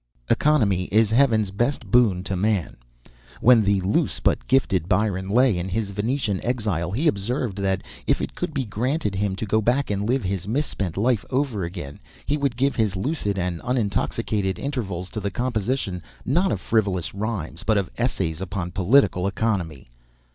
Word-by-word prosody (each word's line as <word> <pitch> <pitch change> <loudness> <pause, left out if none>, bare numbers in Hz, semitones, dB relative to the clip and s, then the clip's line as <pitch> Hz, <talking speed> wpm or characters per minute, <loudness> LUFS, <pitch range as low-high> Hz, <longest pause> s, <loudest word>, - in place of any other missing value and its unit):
] - - -32
economy 105 -12 +3
is 110 +2 +2
heaven's 110 -5 +3
best 120 +8 -1
boon 110 -7 +4
to 95 - -2
man." 100 -2 0 0.6
When 120 -1 +6
the 100 -1 +2
loose 95 +3 0
but - - 0
gifted 95 -10 +2
Byron 95 -1 +1
lay 120 -3 +3
in 90 +2 -3
his 100 +1 -2
Venetian 105 0 -1
exile 105 -9 -1
he 130 - 0
observed 105 -1 -1
that, 95 -1 0 0.2
if - - +3
it - - -4
could - - -3
be 140 -4 -2
granted 120 +3 -1
him 95 0 -1
to 105 - -4
go 110 +1 +2
back 125 +3 +1
and 100 0 -1
live 125 +2 +1
his 95 0 -3
misspent 105 - -2
life 115 0 +2
over 130 -7 0
again, 85 -5 -6 0.3
he 145 - +1
would 140 -5 -1
give 135 0 +1
his 110 -5 +1
lucid 105 - -1
and 90 -2 -2
unintoxicated 105 -4 -1
intervals 100 -11 -3
to 110 - -4
the 100 -1 -2
composition, 120 -5 -2 0.2
not 175 +9 +2
of 105 - -1
frivolous 100 -5 0
rhymes, 100 -5 -4
but 110 +1 +2
of 100 -3 -1
essays 95 -9 -1
upon 95 -2 -4
political 95 0 +3
economy. 95 - -2
105 Hz, 175 wpm, -24 LUFS, 95-125 Hz, 0.6 s, When